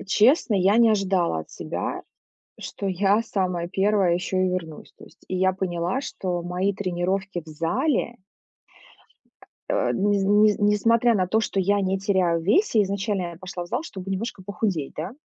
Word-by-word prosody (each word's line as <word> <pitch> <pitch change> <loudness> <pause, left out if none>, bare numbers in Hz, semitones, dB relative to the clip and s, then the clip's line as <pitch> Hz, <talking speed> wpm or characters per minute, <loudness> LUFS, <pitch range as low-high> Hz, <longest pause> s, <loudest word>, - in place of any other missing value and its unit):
м, - - -10
честно, 220 - +3
я 195 +4 +3
не 230 -1 +5
ожидала 190 - +1
от 80 - -12
себя, - - -4 0.6
что 200 - -6
я 195 +4 +2
самая 180 -5 -2
1 195 -2 +2
ещё 180 +1 -2
и 185 0 +2
вернусь, 165 -4 -5
то - - -13
есть. - - -21
И 185 - -2
я 190 0 +2
поняла, 180 +4 -2
что 180 -9 -4
мои 180 +3 -1
тренировки 185 -1 -2
в - - -38
зале 235 - -1 1.5
Э, - - +1
ни 205 +1 +1
с 195 - 0
ни 210 +2 +5
с - - -5
несмотря 225 +3 +3
на 185 -2 +1
то, 220 +3 +2
что 200 -3 -1
я 200 +2 +2
не 190 0 0
теряю 185 -4 +1
в - - -10
весе, 235 - +3
изначально 200 0 -2
я 165 - -12
пошла 185 -1 -6
в - - -11
зал, 295 - -2
чтобы 195 - -7
немножко 195 -1 -4
похудеть, 185 -6 -2
да. 170 +6 -4
195 Hz, 185 wpm, -24 LUFS, 180-205 Hz, 1.5 s, не